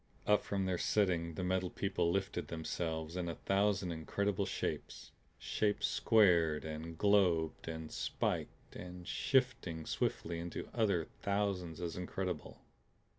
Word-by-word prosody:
Up 105 Hz, -1 st, +4 dB
from 100 Hz, -1 st, -1 dB
their 90 Hz, -2 st, 0 dB
setting 85 Hz, -5 st, +1 dB
the 95 Hz, -, -3 dB
Metal 95 Hz, 0 st, +1 dB
People 90 Hz, -3 st, 0 dB
lifted 90 Hz, -3 st, -1 dB
themselves 80 Hz, 0 st, -3 dB
in 90 Hz, -2 st, -2 dB
a 85 Hz, -, -3 dB
thousand 95 Hz, -2 st, +1 dB
incredible 100 Hz, +5 st, -1 dB
shapes, -, -, -4 dB, 0.3 s
shapes 105 Hz, -1 st, 0 dB
squared 85 Hz, -9 st, +4 dB
and 80 Hz, +1 st, -5 dB
globed 90 Hz, -7 st, +3 dB
and 80 Hz, -1 st, -5 dB
spiked -, -, -3 dB
and 90 Hz, -1 st, -8 dB
shifting 125 Hz, -, +1 dB
swiftly 85 Hz, 0 st, -1 dB
into 85 Hz, +1 st, -5 dB
other 100 Hz, -8 st, +2 dB, 0.2 s
thousands 100 Hz, -5 st, -1 dB
as 85 Hz, -1 st, -3 dB
incredible. 90 Hz, +1 st, -4 dB
90 Hz, 125 wpm, -35 LUFS, 85-100 Hz, 0.3 s, Up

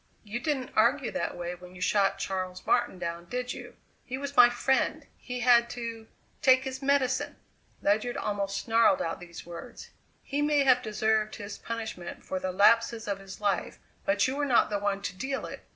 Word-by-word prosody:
"You 220 Hz, +2 st, -4 dB
didn't 265 Hz, -1 st, -2 dB
argue 245 Hz, +4 st, +3 dB
that 275 Hz, -, -3 dB
way 175 Hz, 0 st, -4 dB
when 180 Hz, 0 st, -12 dB
you 180 Hz, -, -11 dB
shot 195 Hz, 0 st, +2 dB
Charles 185 Hz, -2 st, -4 dB
Martin -, -, +2 dB
down, 170 Hz, -1 st, -4 dB
did 250 Hz, +5 st, -3 dB
you? -, -, -10 dB, 0.3 s
He 255 Hz, -, -5 dB
was 280 Hz, +1 st, -5 dB
my 245 Hz, -2 st, +9 dB
friend; 245 Hz, +2 st, 0 dB
he 250 Hz, -1 st, -6 dB
had 235 Hz, -1 st, +5 dB
to 230 Hz, -2 st, -5 dB, 0.3 s
take 260 Hz, -1 st, +5 dB
his 265 Hz, 0 st, -5 dB
medicine!" 270 Hz, -2 st, +1 dB, 0.5 s
Ledyard 215 Hz, +4 st, +1 dB
almost 200 Hz, -1 st, -2 dB
snarled 225 Hz, -4 st, +4 dB
out 165 Hz, -, -3 dB
these 170 Hz, -1 st, -10 dB
words. 175 Hz, +8 st, -10 dB, 0.3 s
"He 285 Hz, +1 st, -2 dB
may 295 Hz, -1 st, +3 dB
have 255 Hz, -2 st, +5 dB
deserved 215 Hz, -1 st, 0 dB
his 205 Hz, -2 st, -7 dB
punishment 220 Hz, -7 st, -6 dB
for 185 Hz, -, -3 dB
the 185 Hz, 0 st, -2 dB
lapses 225 Hz, +3 st, +3 dB
of 200 Hz, -1 st, -2 dB
his 195 Hz, -1 st, -10 dB
life 200 Hz, -3 st, -1 dB, 0.3 s
but 200 Hz, +3 st, +2 dB
you 260 Hz, -, -2 dB
were 290 Hz, -, -1 dB
not 250 Hz, -5 st, +3 dB
the 205 Hz, -, 0 dB
one 200 Hz, -1 st, -1 dB
to 185 Hz, -, -4 dB
deal 265 Hz, +7 st, -3 dB
it. -, -, -9 dB
220 Hz, 190 wpm, -28 LUFS, 195-255 Hz, 0.5 s, my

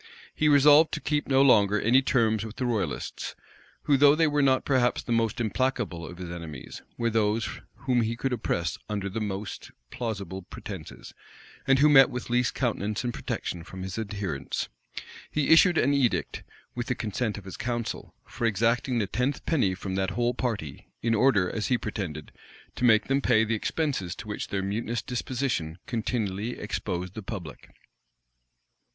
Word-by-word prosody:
He 150 Hz, -, +2 dB
resolved 150 Hz, +2 st, +7 dB
to -, -, -1 dB
keep 150 Hz, -1 st, -1 dB
no 135 Hz, 0 st, +4 dB
longer 105 Hz, -6 st, +5 dB
any 125 Hz, +6 st, +4 dB
terms 110 Hz, -5 st, +2 dB
with 110 Hz, 0 st, -7 dB
the 130 Hz, -, -2 dB
royalists, 115 Hz, -5 st, -3 dB, 0.5 s
who, 140 Hz, -, +3 dB
though 145 Hz, +1 st, +6 dB
they 160 Hz, +1 st, +3 dB
were 145 Hz, -1 st, +2 dB
not 130 Hz, -2 st, +3 dB
perhaps 125 Hz, -3 st, +2 dB
the -, -, -5 dB
most 115 Hz, +1 st, +1 dB
implacable 115 Hz, -7 st, -1 dB
of 90 Hz, -, -10 dB
his 90 Hz, -1 st, -6 dB
enemies, 80 Hz, -6 st, -8 dB, 0.2 s
were 115 Hz, -1 st, 0 dB
those 110 Hz, 0 st, 0 dB, 0.2 s
whom 125 Hz, -2 st, +2 dB
he 115 Hz, +1 st, -1 dB
could 130 Hz, +2 st, -2 dB
oppress 85 Hz, -9 st, -2 dB
under 100 Hz, -2 st, -2 dB
the 110 Hz, +4 st, -4 dB
most 105 Hz, -1 st, -5 dB, 0.2 s
plausible 100 Hz, -6 st, -4 dB
pretences, 90 Hz, -, -9 dB, 0.5 s
and 135 Hz, -, +5 dB
who 145 Hz, +3 st, +6 dB
met 135 Hz, -3 st, +7 dB
with 125 Hz, -1 st, -6 dB
least 125 Hz, +1 st, +1 dB
countenance 110 Hz, -4 st, -1 dB
and 120 Hz, -1 st, -2 dB
protection 85 Hz, -6 st, -4 dB
from 95 Hz, +2 st, -8 dB
his 95 Hz, +3 st, -4 dB
adherents. 100 Hz, -10 st, -3 dB, 0.6 s
He 150 Hz, -2 st, 0 dB
issued 170 Hz, +1 st, +6 dB
an 140 Hz, +3 st, +3 dB
edict, 135 Hz, -4 st, 0 dB, 0.3 s
with 120 Hz, 0 st, -4 dB
the 125 Hz, -, 0 dB
consent 110 Hz, 0 st, -2 dB
of 100 Hz, -, -10 dB
his 95 Hz, -, -7 dB
council, 120 Hz, -2 st, -4 dB
for 115 Hz, -, -2 dB
exacting 115 Hz, +4 st, +1 dB
the 110 Hz, -, +1 dB
tenth 125 Hz, +8 st, -2 dB
penny 115 Hz, -, +1 dB
from 95 Hz, 0 st, -5 dB
that 95 Hz, 0 st, 0 dB
whole 120 Hz, +5 st, 0 dB
party; 110 Hz, -, -4 dB, 0.2 s
in 115 Hz, 0 st, +2 dB
order, 110 Hz, -5 st, +4 dB
as 105 Hz, +3 st, -2 dB
he 125 Hz, -, +2 dB
pretended, 80 Hz, -10 st, -5 dB, 0.4 s
to 125 Hz, -, 0 dB
make 110 Hz, -2 st, +5 dB
them 135 Hz, +1 st, +1 dB
pay 110 Hz, -4 st, +4 dB
the 110 Hz, +1 st, -1 dB
expenses 110 Hz, -, -1 dB
to 105 Hz, -, -9 dB
which 105 Hz, -, -4 dB
their 95 Hz, -1 st, -2 dB
mutinous 110 Hz, +3 st, -2 dB
disposition 120 Hz, -, -2 dB
continually 110 Hz, -2 st, -2 dB
exposed 95 Hz, -3 st, -4 dB
the 110 Hz, -, -6 dB
public. 95 Hz, -7 st, -8 dB
115 Hz, 175 wpm, -27 LUFS, 100-130 Hz, 0.6 s, resolved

